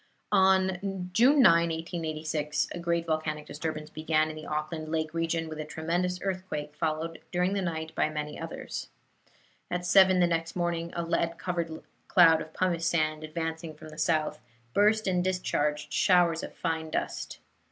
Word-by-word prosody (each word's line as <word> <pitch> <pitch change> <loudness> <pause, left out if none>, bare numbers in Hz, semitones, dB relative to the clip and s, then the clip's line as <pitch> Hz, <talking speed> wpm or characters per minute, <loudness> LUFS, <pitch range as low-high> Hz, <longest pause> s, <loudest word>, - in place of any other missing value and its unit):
On 190 -1 +2
June 260 +7 +6
9, 180 - +9 0.2
1886, 155 -2 -2
a - - -5
great 170 0 0
volcanic 155 -2 -2
disturbance 155 0 -5
began 155 0 +1
in - - -9
the 155 - -8
Auckland 155 +1 -3
Lake 155 -1 -1
region 165 0 -1
with 155 -1 -7
a - - -2
tremendous 170 +4 -1
earthquake, 185 -6 -4
followed 160 +1 -2
during 180 +2 +1
the 200 - 0
night 160 -3 -3
by - - +1
many 150 -1 -5
others. - - -6 0.8
At 180 0 -2
seven 185 0 +6
the 175 - +5
next 165 -1 -1
morning 170 -1 -1
a 170 - -1
lead 170 0 0
covered 170 -3 -3 0.2
cloud 165 -3 +6
of 155 - -8
pumice 170 -1 0
sand, 155 -2 0
advancing 160 0 -4
from 155 - -11
the 155 - -12
south, 155 -1 +1 0.3
burst 215 +1 +3
and 180 -2 +1
discharged 150 -5 -1
showers 175 -3 +4
of - - -8
fine 160 -2 -2
dust. - - -3
165 Hz, 165 wpm, -29 LUFS, 155-180 Hz, 0.8 s, 9